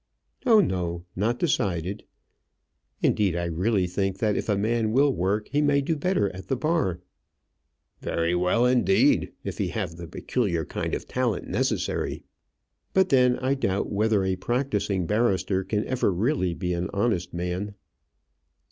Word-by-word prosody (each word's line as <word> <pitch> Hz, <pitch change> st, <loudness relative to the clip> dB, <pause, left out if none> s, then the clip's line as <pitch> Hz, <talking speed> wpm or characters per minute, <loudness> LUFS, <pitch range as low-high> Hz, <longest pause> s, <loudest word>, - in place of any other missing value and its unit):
"Oh, 220 Hz, -3 st, +7 dB
no; 85 Hz, -, -2 dB
not 115 Hz, +6 st, 0 dB
decided. 100 Hz, -, -1 dB, 1.0 s
Indeed, 100 Hz, -5 st, +2 dB
I 85 Hz, 0 st, -1 dB
really 90 Hz, +4 st, +1 dB
think 95 Hz, +2 st, -1 dB
that 105 Hz, 0 st, +1 dB
if -, -, -3 dB
a 100 Hz, -, +2 dB
man 110 Hz, +1 st, 0 dB
will 140 Hz, +2 st, +4 dB
work, 100 Hz, +3 st, -1 dB
he 145 Hz, +1 st, +2 dB
may 145 Hz, -1 st, +3 dB
do 160 Hz, +4 st, -1 dB
better 145 Hz, -, 0 dB
at 95 Hz, -, -9 dB
the 135 Hz, -, 0 dB
bar." 125 Hz, -, 0 dB, 1.0 s
"Very 85 Hz, +1 st, -1 dB
well, 90 Hz, +7 st, +2 dB
indeed 125 Hz, -6 st, +3 dB
if -, -, -5 dB
he -, -, +1 dB
have 80 Hz, -, -4 dB
the 85 Hz, -1 st, -7 dB
peculiar 85 Hz, -6 st, -1 dB
kind -, -, -3 dB
of -, -, -7 dB
talent 125 Hz, -7 st, -1 dB
necessary." -, -, -1 dB, 0.7 s
"But 190 Hz, -1 st, +4 dB
then, 125 Hz, -2 st, +4 dB
I 130 Hz, +1 st, 0 dB
doubt 100 Hz, -8 st, -1 dB
whether 105 Hz, -1 st, +2 dB
a 95 Hz, 0 st, 0 dB
practising 105 Hz, -4 st, -1 dB
barrister 95 Hz, -3 st, +1 dB
can 105 Hz, +2 st, -1 dB
ever 130 Hz, -5 st, +1 dB
really 95 Hz, -, 0 dB
be 90 Hz, -1 st, -2 dB
an 85 Hz, +1 st, -2 dB
honest 100 Hz, -4 st, 0 dB
man." 90 Hz, +4 st, -3 dB
100 Hz, 155 wpm, -26 LUFS, 90-125 Hz, 1.0 s, Oh